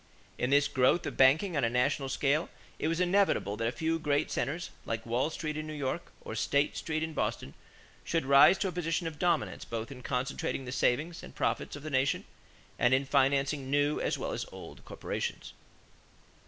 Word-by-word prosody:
In 125 - 0
this 145 +1 +4
growth 130 +7 +2
of - - -4
banking 155 +8 +4
on 140 - +1
a 115 - +3
national 125 +3 +1
scale, 145 +4 +1 0.3
it - - 0
was 165 +1 0
inevitable 180 - +2
that 115 +1 -1
a - - 0
few 160 +5 -1
great 145 -2 0
centers, 165 +5 -2
like 115 -1 -4
Wall 120 +5 0
Street 155 -1 -4
in 155 0 -4
New 155 - -6
York 145 +4 -3
or - - -7
State 140 +6 +1
Street 160 -1 -2
in 160 0 -4
Boston, 70 - -2 0.5
should 165 -5 -1
rise 140 +7 +7
to 195 - 0
a - - -2
position 170 -1 -1
of 160 -2 -5
dominance 170 -3 0
both 115 +2 -5
in 130 -2 -9
concentrating 130 +1 -2
the 130 - -5
savings 150 +6 0
and - - -12
profits - - -1
of 145 - -9
the 155 - -5
nation 130 +1 +1 0.5
and 125 +1 +4
in 135 +1 0
financing 135 0 +1
new 145 +1 +2
as - - -1
well - - -3
as - - -3
old - - -11
corporations. - - -5
145 Hz, 195 wpm, -30 LUFS, 130-160 Hz, 0.5 s, rise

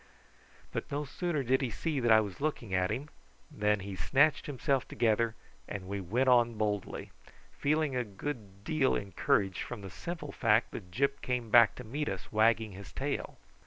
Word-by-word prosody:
But - - -4
no 145 +1 -1
sooner 155 +1 -2
did 130 +2 +2
he 130 - 0
see 145 +7 -2
that 120 -2 +2
I 110 0 +8
was 100 0 -6
looking 135 -9 -2
at 90 0 +2
him 145 +4 -3 0.4
than 105 -1 +1
he 100 0 -6
snatched 145 - +3
himself 135 -1 0
together, 115 0 +1 0.3
and 95 -2 -6
we 100 0 -3
went 115 +9 0
on 120 -2 +5
boldly, 105 -2 -2 0.5
feeling 150 -1 +1
a 125 - +1
good 100 -2 -7
deal 145 +1 +2
encouraged 95 -1 0
from 120 -4 -6
the 95 -2 -8
simple 160 - -6
fact 115 0 +2
that 90 -4 -8
Gyp 140 +8 0
came 125 -3 -2
back 115 -3 +7
to 125 - -8
meet 145 +7 -3
us 95 -2 -6
wagging 110 0 +3
his 100 0 -10
tail. - - -3
115 Hz, 180 wpm, -31 LUFS, 100-140 Hz, 0.5 s, I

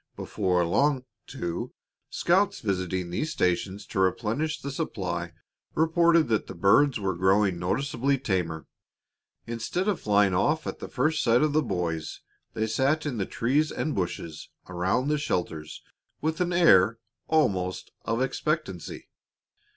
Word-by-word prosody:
Before 90 -4 0
long, 135 - +1 0.2
too, 85 0 -4 0.4
scouts 190 +3 +2
visiting 95 -3 -2
these 155 - -2
stations 95 - -1
to - - -4
replenish 115 - 0
the 140 - -5
supply 90 - -3 0.4
reported 165 +1 +4
that 110 -2 0
the - - -8
birds 115 +9 +4
were 95 -2 -1
growing 95 +1 +2
noticeably 135 +8 0
tamer. 90 -10 -2 0.8
Instead 115 - -3
of 205 -4 0
flying 100 -2 +3
off 150 - +1
at - - -5
the - - -6
first 155 +4 0
sight 120 +4 +3
of 155 -1 +1
the 155 - +4
boys, 85 - -3 0.3
they 110 -1 0
sat 135 +8 +1
in 140 -5 -2
the 95 - -2
trees 145 +6 +1
and 155 - -2
bushes 85 -4 -4 0.2
around 90 +9 0
the 150 0 +1
shelters 80 - -3 0.4
with 160 +3 -2
an 180 0 +1
air 115 - +5 0.3
almost 95 - 0
of 115 +3 0
expectancy. 135 - -3
110 Hz, 140 wpm, -27 LUFS, 90-150 Hz, 0.8 s, air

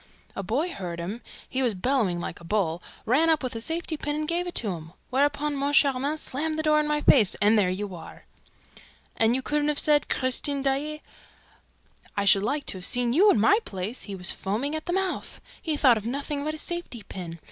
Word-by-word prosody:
A - - -3
boy 265 - -1
heard 175 -3 -6
him 200 +8 -5 0.3
he 260 - -1
was 240 -5 +1
bellowing 205 -4 0
like 170 - -6
a - - -15
bull 170 -2 -1 0.2
ran 290 +8 +3
up 315 -3 +2
with 255 -1 -3
a 225 - -4
safety 325 +3 -2
pin 295 0 -3
and 305 0 -2
gave 345 +2 -1
it 350 - -6
to 220 - +2
him; 165 -1 -8 0.2
whereupon 285 +2 +1
Moncharmin 280 0 +2
slammed 310 +2 -3
the 315 - -1
door 305 0 +4
in 300 - 0
my 300 0 0
face, 220 -10 +5
and 210 +2 +3
there 200 -4 +3
you 195 +1 -4
are!" 170 - -11 0.9
"And 240 +4 +1
couldn't 295 0 0
you - - +1
have 300 - 0
said, 295 -1 +3
'Christine 270 +2 +1
Daae.'" 290 +3 -1 1.1
"I 200 - +1
should 195 0 +5
like 280 +7 -1
to 190 - -3
have 180 - -2
seen 245 -1 +2
you 390 +9 +6
in 225 - +4
my 400 - +5
place. 195 +5 -5
He 200 - -6
was 180 -2 +4
foaming 225 +10 -3
at 315 +2 -5
the 350 - -1
mouth. 380 0 -2 0.2
He 310 -2 -1
thought 255 -5 +5
of 215 - -6
nothing 280 +3 -3
but 310 +1 -2
his 310 - -3
safety 345 -10 -5
pin. 170 -3 -8
265 Hz, 220 wpm, -26 LUFS, 205-300 Hz, 1.1 s, you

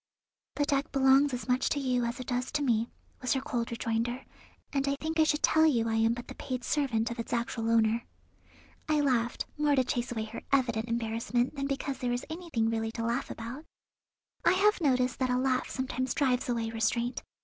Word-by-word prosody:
"The 290 - +1
deck 280 +1 0
belongs 270 +1 +5
as 250 -1 -4
much 250 0 +2
to 290 - 0
you 250 -3 +1
as 235 +3 -3
it 255 - -5
does 245 +1 -2
to 295 -1 +1
me," 230 -3 +1 0.3
was 255 - +1
her 265 - +1
cold 245 -5 -2
rejoinder, 235 +2 -2 0.5
"and 275 0 0
I 280 - +1
think 320 +1 -2
I - - +7
should 300 -1 +1
tell 315 0 +5
you 235 -6 +2
I 225 - 0
am 225 +1 +3
but 245 - -8
the - - -7
paid 255 -3 -5
servant 240 -7 0
of 235 - -6
its 230 - -5
actual 235 -1 -1
owner." 230 0 +3 0.8
I 305 -1 +3
laughed, 245 -4 +1
more 295 -1 +3
to 260 - +4
chase 245 -1 -2
away 225 -2 -2
her 220 +1 -7
evident 235 -5 +2
embarrassment 230 +1 0
than 275 -1 -2
because 275 0 -3
there 250 - -1
was 245 +1 -2
anything 320 -10 -1
really 225 0 -1
to 230 -1 -3
laugh 235 +2 -1
about. 235 +6 -6 0.8
I - - +5
have 400 +1 +3
noticed 255 -4 +2
that 260 -1 +1
a 250 - +2
laugh 255 0 +1
sometimes 260 0 -2
drives 255 -5 +1
away 230 -2 -1
restraint. 235 +2 0
250 Hz, 210 wpm, -30 LUFS, 230-275 Hz, 0.8 s, I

